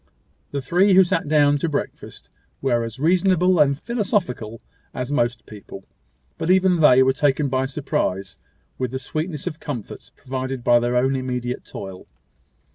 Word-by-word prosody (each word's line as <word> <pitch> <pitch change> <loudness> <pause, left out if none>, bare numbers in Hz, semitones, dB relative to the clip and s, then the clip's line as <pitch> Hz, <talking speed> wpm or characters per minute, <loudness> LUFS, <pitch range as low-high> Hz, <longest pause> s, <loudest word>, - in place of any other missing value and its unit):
The 140 - -3
three 180 +9 +3
who 190 - +8
sat 165 -3 -1
down 145 -1 +3
to 165 - -1
breakfast 145 - -6 0.3
were 120 -3 0
as 115 +2 -7
reasonable 180 +2 +3
and 140 -2 +4
philosophical 190 - -2 0.4
as 125 +1 -4
most 120 -4 0
people; 100 -2 -11 0.5
but 160 - -2
even 185 -1 +4
they 130 -4 +6
were 130 0 +3
taken 145 +1 +1
by 130 0 0
surprise 100 -9 -3 0.4
with 130 -1 -1
the 130 - -4
sweetness 155 +3 -4
of 155 - -5
comforts 125 -8 -7
provided 130 -1 -5
by 120 0 +5
their 120 +1 0
own 130 +2 +2
immediate 125 -1 -3
toil. 95 -1 -9
135 Hz, 155 wpm, -22 LUFS, 125-160 Hz, 0.5 s, who